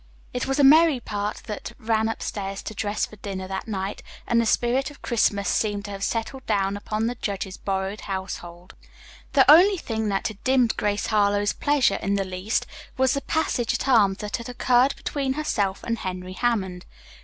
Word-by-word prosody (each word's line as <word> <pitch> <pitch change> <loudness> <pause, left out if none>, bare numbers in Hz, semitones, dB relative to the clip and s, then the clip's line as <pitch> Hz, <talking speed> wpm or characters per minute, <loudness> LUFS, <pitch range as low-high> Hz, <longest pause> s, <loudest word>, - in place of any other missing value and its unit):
It 250 - -2
was 270 - 0
a 285 - +4
merry 305 0 +6
party 210 -2 -4
that 210 - -6
ran 220 0 +1
upstairs 195 -3 -4
to - - -6
dress 205 0 -1
for 215 - -14
dinner 190 -2 -5
that 190 +2 -5
night, 195 -1 -3 0.2
and 235 -1 +3
the 230 - 0
spirit 250 +4 +1
of 290 - -16
Christmas 205 -4 +1
seemed 205 -2 0
to 205 - -6
have 195 0 -5
settled 235 +5 -2
down 200 -2 +1
upon 215 +2 -2
the 240 - 0
judge's 195 -4 -4
borrowed 195 +1 -3
household. 185 -2 -6 0.6
The 270 -3 +6
only 365 +7 +8
thing 220 -8 -2
that 195 -1 0
had 215 -2 -12
dimmed 255 -3 +3
Grace 205 0 -1
Harlowe's 205 -1 +2
pleasure 280 -9 +2
in 200 +1 0
the 195 -1 0
least 185 +4 -2 0.3
was 260 0 +3
the 280 - -1
passage 265 -8 0
at - - -3
arms 205 -7 +4
that 210 0 -3
had 235 0 -8
occurred 250 +2 +3
between 275 -2 -2
herself 210 -10 -1
and 230 -1 -2
Henry 185 0 -5
Hammond. 190 -6 -1
215 Hz, 190 wpm, -24 LUFS, 195-250 Hz, 0.6 s, only